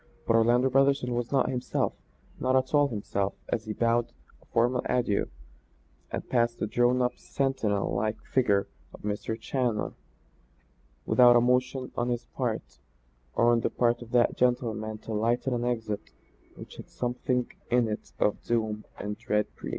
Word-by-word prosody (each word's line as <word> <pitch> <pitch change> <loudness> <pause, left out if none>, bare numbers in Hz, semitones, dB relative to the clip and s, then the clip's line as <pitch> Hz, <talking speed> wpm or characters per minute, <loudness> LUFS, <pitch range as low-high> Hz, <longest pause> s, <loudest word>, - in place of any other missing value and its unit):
But 115 - +3
Orlando 120 +3 +4
Brotherson 135 -1 +3
was 120 0 -2
not 135 -2 +3
himself, 125 -1 -1 0.5
not 130 0 +1
at 130 +1 +1
all 145 -1 +5
himself 100 -4 -2
as 110 - -1
he 110 - -3
bowed 115 +1 +1 0.3
a - - -23
formal 120 +2 +2
adieu 120 -5 +1 0.8
and - - -4
withdrew - - -27
past 120 -1 +2
the - - -1
drawn 120 +3 +2
up 125 - -1
sentinel 130 -8 -1
like 110 0 0
figure 100 -7 +2 0.3
of - - -15
Mr. 105 +2 -3
Challoner, 120 -3 -1 1.1
without 120 -1 +6
a 120 - +6
motion 125 +1 +1
on 120 +1 0
his 120 -1 -2
part - - -4 0.6
or 120 0 +4
on 120 - +4
the - - 0
part 120 0 +1
of 120 - -9
that 120 0 +3
gentleman 115 -3 0
to 110 - -7
lighten 120 +4 +1
an 120 0 -1
exit 115 -4 -2 0.5
which - - -11
had - - -10
something 125 0 -2 0.2
in 120 -1 +3
it 105 -1 -5
of 105 - +1
doom 110 -2 -1
and 105 +1 -5
dread 105 -3 -1
presage. - - -7
120 Hz, 165 wpm, -28 LUFS, 110-125 Hz, 1.1 s, without